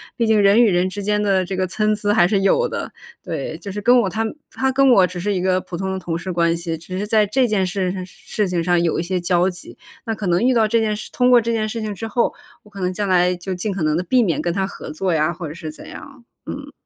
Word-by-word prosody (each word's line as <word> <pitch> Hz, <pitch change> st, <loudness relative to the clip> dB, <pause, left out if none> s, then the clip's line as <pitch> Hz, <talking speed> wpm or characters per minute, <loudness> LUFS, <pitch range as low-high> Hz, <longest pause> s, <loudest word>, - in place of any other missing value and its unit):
毕 235 Hz, -, 0 dB
竟 220 Hz, -2 st, +3 dB
人 200 Hz, +4 st, +5 dB
与 225 Hz, -, +4 dB
人 180 Hz, +1 st, +2 dB
之 200 Hz, +2 st, -5 dB
间 210 Hz, +1 st, +1 dB
的 195 Hz, -2 st, +2 dB
这 190 Hz, +1 st, -5 dB
个 185 Hz, 0 st, 0 dB
参 215 Hz, +3 st, 0 dB
差 205 Hz, -1 st, 0 dB
还 190 Hz, -5 st, +5 dB
是 195 Hz, +2 st, +2 dB
有 480 Hz, -, +2 dB
的， -, -, -5 dB, 0.3 s
对。 -, -, -5 dB
就 200 Hz, -, -9 dB
是 205 Hz, +2 st, -5 dB
跟 245 Hz, +3 st, +5 dB
我 225 Hz, -, +1 dB
他 220 Hz, +4 st, -2 dB, 0.3 s
他 265 Hz, 0 st, -1 dB
跟 270 Hz, 0 st, +4 dB
我 195 Hz, -6 st, +6 dB
只 180 Hz, 0 st, -6 dB
是 205 Hz, +3 st, -1 dB
一 185 Hz, -, -1 dB
个 185 Hz, 0 st, +2 dB
普 180 Hz, -, -8 dB
通 190 Hz, +2 st, -3 dB
的 190 Hz, -, -3 dB
同 170 Hz, -3 st, -3 dB
事 185 Hz, +2 st, -5 dB
关 170 Hz, -1 st, +1 dB
系， 165 Hz, -1 st, -4 dB
只 185 Hz, +3 st, -7 dB
是 200 Hz, -, -2 dB
在 215 Hz, 0 st, +3 dB
这 255 Hz, +6 st, +2 dB
件 195 Hz, -3 st, +1 dB
事 185 Hz, -1 st, -1 dB
事 205 Hz, +2 st, -4 dB
情 175 Hz, -2 st, -1 dB
上 175 Hz, 0 st, +2 dB
有 170 Hz, -1 st, 0 dB
一 -, -, -1 dB
些 180 Hz, +1 st, -1 dB
交 175 Hz, +1 st, +2 dB
集， 180 Hz, -1 st, -10 dB, 0.3 s
那 225 Hz, -, -2 dB
可 205 Hz, -, -6 dB
能 175 Hz, +1 st, +2 dB
遇 255 Hz, +2 st, +3 dB
到 230 Hz, -2 st, +3 dB
这 230 Hz, +2 st, +2 dB
件 215 Hz, -1 st, 0 dB
事 210 Hz, -, -8 dB
通 250 Hz, 0 st, +2 dB
过 245 Hz, -1 st, +6 dB
这 230 Hz, +1 st, -2 dB
件 220 Hz, -1 st, 0 dB
事 225 Hz, +1 st, -4 dB
情 215 Hz, -1 st, -3 dB
之 215 Hz, +3 st, -6 dB
后， 235 Hz, +2 st, 0 dB, 0.3 s
我 210 Hz, -, -19 dB
可 200 Hz, -1 st, -11 dB
能 180 Hz, 0 st, -1 dB
将 205 Hz, +1 st, -2 dB
来 180 Hz, 0 st, +3 dB
就 180 Hz, +2 st, -5 dB
尽 190 Hz, +3 st, -3 dB
可 185 Hz, -4 st, -3 dB
能 155 Hz, 0 st, +1 dB
地 180 Hz, -, -1 dB
避 250 Hz, +6 st, +3 dB
免 165 Hz, -7 st, 0 dB
跟 170 Hz, +1 st, -1 dB
他 190 Hz, +1 st, 0 dB
合 195 Hz, -, -8 dB
作 180 Hz, +3 st, -1 dB
呀， 160 Hz, +1 st, +1 dB
或 170 Hz, -2 st, -6 dB
者 -, -, -7 dB
是 160 Hz, -1 st, -7 dB
怎 155 Hz, -, -11 dB
样， 275 Hz, -3 st, -11 dB, 0.2 s
嗯。 -, -, -7 dB
195 Hz, 315 characters per minute, -20 LUFS, 175-215 Hz, 0.3 s, 我